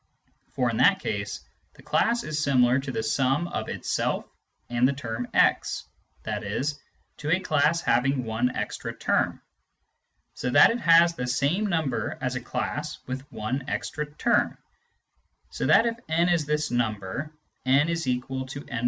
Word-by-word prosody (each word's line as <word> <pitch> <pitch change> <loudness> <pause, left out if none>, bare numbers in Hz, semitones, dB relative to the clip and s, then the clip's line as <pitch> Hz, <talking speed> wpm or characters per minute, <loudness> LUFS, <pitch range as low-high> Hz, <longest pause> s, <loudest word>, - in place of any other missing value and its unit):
For - - +1
in - - -3
that - - +5
case, - - -3 0.3
the - - -17
class 235 +1 +1
is 150 -1 -2
similar 130 -2 +4
to 135 0 -5
the 110 - -2
sum 135 +8 +1
of - - -4
itself - - -1 0.4
and 120 +1 +2
the 140 - +1
term 120 -3 -4
x, - - +2 0.4
i.e. - - -2 0.5
to 150 - -5
a 175 - +4
class 160 -1 +2
having 130 +2 +2
one 115 +2 0
extra - - -4
term; - - 0 0.9
so 125 - -3
that 125 - +7
it 235 - -2
has 170 -3 +6
the 125 -6 -4
same 145 +11 +1
number 160 -7 -1
as 130 0 -2
a 130 - -3
class 150 +5 -3
with 130 +2 -6
one 130 +5 -3
extra 150 0 -3
term, 235 +9 +1 0.9
so - - -2
that 230 - +6
if 230 0 -1
n 170 +2 +2
is 165 -4 +1
this 150 -2 0
number, 115 +4 -2 0.3
n=n 135 +4 +4
\ 165 -2 -1 0.7
i. 120 - -2
140 Hz, 155 wpm, -26 LUFS, 125-165 Hz, 0.9 s, that